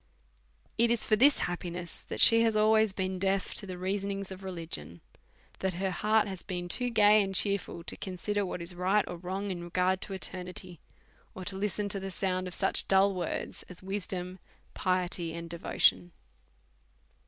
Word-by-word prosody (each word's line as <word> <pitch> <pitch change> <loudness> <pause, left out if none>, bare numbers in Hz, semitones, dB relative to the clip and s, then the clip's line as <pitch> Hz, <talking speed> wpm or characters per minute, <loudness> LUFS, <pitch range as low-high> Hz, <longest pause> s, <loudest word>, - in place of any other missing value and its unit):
It 235 0 +4
is 235 -1 +3
for 215 - +4
this 275 +6 +6
happiness 175 0 -5
that - - -7
she 230 0 +8
has 225 -1 +2
always 215 0 +4
been 190 -1 -3
deaf 195 0 0
to 200 - -5
the 185 -1 -6
reasonings 195 +1 -3
of 190 0 -9
religion, 165 - -5 0.6
that 190 -2 -1
her 190 +1 -1
heart 215 +3 +2
has 190 -3 -4
been 180 -2 -5
too 245 +7 +1
gay 215 -2 +6
and 195 -1 -2
cheerful 200 -4 +1
to - - -6
consider 200 +2 -3
what 180 -2 -4
is 170 +2 -2
right 190 +4 +1
or 175 - -6
wrong 190 +3 -4
in 175 -2 -5
regard 180 +2 0
to 195 - -3
eternity, 180 -1 -5 0.6
or 185 - -7
to 195 - -3
listen 205 +1 -2
to 195 - 0
the 195 0 -5
sound 185 -1 -2
of 180 - -5
such - - +2
dull 195 +1 +4
words 180 -3 -4
as 180 0 -11
wisdom, 185 -1 -4 0.3
piety, 180 -2 -1
and 170 0 -7
devotion. 170 0 +2
190 Hz, 175 wpm, -30 LUFS, 180-200 Hz, 0.6 s, she